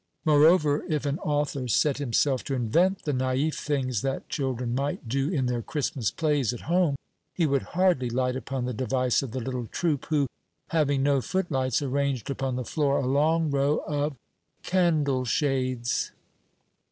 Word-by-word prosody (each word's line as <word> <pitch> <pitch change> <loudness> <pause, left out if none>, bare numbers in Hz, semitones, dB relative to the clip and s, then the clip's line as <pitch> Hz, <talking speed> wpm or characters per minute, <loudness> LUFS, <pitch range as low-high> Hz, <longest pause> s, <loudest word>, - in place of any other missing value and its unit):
Moreover, 150 0 +5
if 150 -2 -1
an 145 +3 -1
author 145 -3 -1
set 140 +4 +2
himself 135 0 +1
to 135 - -2
invent 170 - +1
the 150 - -1
naif 130 +4 0
things 130 -6 -1
that 135 +1 -3
children 125 -4 -2
might 135 -1 -2
do 135 +4 0
in 145 -8 0
their 125 -1 -1
Christmas 130 -3 -2
plays 145 -7 0
at 120 - -7
home, 170 -3 +2 0.4
he 170 - +2
would 140 -3 +2 0.2
hardly 180 -10 +3
light 125 +1 0
upon 130 0 -3
the 125 - -2
device 130 +1 +1
of 135 - -5
the 130 +4 -4
little 125 -1 -4
troupe 155 -1 -1
who, 150 -3 +2 0.4
having 145 -4 +1
no 140 -1 +3
footlights, 140 - -1
arranged 140 -2 -1
upon 135 -2 -2
the 125 -1 -3
floor 140 0 +1
a 135 - -1
long 155 +4 +2
row 140 +2 +1
of 145 -1 -1 0.5
candle 155 -8 +2
shades! 130 -2 0
140 Hz, 165 wpm, -27 LUFS, 130-150 Hz, 0.5 s, Moreover